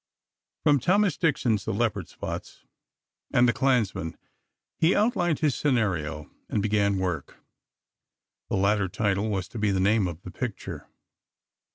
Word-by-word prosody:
From 145 -2 +4
Thomas 195 - +3
Dixon's 135 - +1
"The - - -2
Leopard's 105 -7 -1
Spots" - - -7 0.7
and 120 0 +5
"The 120 - +3
Clansman," 110 - 0 0.6
he 165 +3 +4
outlined 185 - +1
his 150 -4 +3
scenario, 95 - 0 0.2
and - - 0
began 100 -1 +2
work. 90 -6 -3 1.1
The - - 0
latter 100 0 +2
title 105 +1 0
was 95 -4 -2
to 115 - -7
be 105 0 +2
the 95 -1 +1
name 100 +1 +3
of 85 0 -7
the 90 - -8
picture. 120 -2 -5
105 Hz, 140 wpm, -26 LUFS, 95-135 Hz, 1.1 s, and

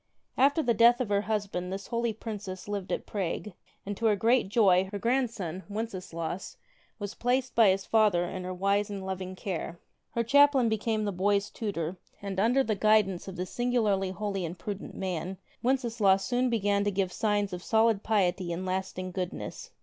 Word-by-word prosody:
After 285 +4 +3
the 240 - +3
death 235 +2 +6
of 250 -5 -1
her 200 -1 +2
husband 205 -4 -2
this 195 +1 -5
holy 235 -1 -1
princess 205 -4 -7
lived 200 -2 -4
at - - -2
Prague, 200 +1 -3 0.3
and, 205 +1 -3
to 230 - +1
her 210 - +4
great 230 +1 +2
joy, 190 -4 +4
her 205 - -3
grandson 225 -7 -1
Wenceslaus 185 -5 -5 0.4
was 205 -2 -5
placed 250 +1 0
by 225 -3 +6
his 190 +1 +1
father 210 -6 +3
in 185 +1 -5
her 180 - -4
wise 200 +3 +1
and 195 -2 -5
loving 185 0 -4
care. 180 -3 -4 0.4
Her 235 - +2
chaplain 280 -1 +5
became 220 0 0
the 205 - 0
boy's 200 +2 +1
tutor, 185 -5 -3 0.2
and 195 -1 -4
under 245 +6 +3
the 220 - 0
guidance 205 -3 +2
of 190 - -6
this 180 0 -5
singularly 220 -6 +1
holy 195 0 -3
and 170 +2 -5
prudent 200 +2 -6
man 185 0 -3 0.2
Wenceslaus 230 -6 +2
soon 250 +4 +1
began 205 -3 +1
to - - +3
give 190 -2 -1
signs 205 -3 0
of 180 - -5
solid 220 0 +3
piety 185 -5 +1
and 175 +2 -3
lasting 185 0 -3
goodness. 180 -1 -5
205 Hz, 180 wpm, -29 LUFS, 185-225 Hz, 0.4 s, death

